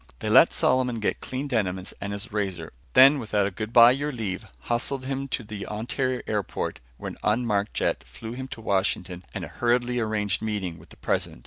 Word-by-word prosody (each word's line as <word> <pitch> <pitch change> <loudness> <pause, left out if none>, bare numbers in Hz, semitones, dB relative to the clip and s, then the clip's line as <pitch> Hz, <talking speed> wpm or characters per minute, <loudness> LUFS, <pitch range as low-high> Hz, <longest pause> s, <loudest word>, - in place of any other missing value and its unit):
They - - -2
let - - +8
Solomon 125 -2 +2
get 105 - -1
clean 130 +3 -4
denims 95 -7 -1
and 100 - -3
his 100 +2 -5
razor. 95 -6 -3 0.2
Then 135 +3 +8
without 105 -4 +1 0.2
a 110 - -1
bye 115 +1 +8
your 145 +3 -1
leave, 110 -7 -4
hustled 130 +3 -1
him 135 0 -2
to 125 - -3
the 105 -2 -7
Ontario 125 +4 -2
airport 105 -2 -2 0.2
where - - -5
an - - -11
unmarked 105 -2 +1
jet - - 0
flew 110 0 -9
him 130 +1 -5
to 115 - -8
Washington 95 -3 -1
and - - -3
a - - -14
hurriedly 120 0 +2
arranged 105 -3 0
meeting 100 -6 -3
with 80 - -17
the - - -15
President. - - -2
110 Hz, 195 wpm, -26 LUFS, 100-125 Hz, 0.2 s, let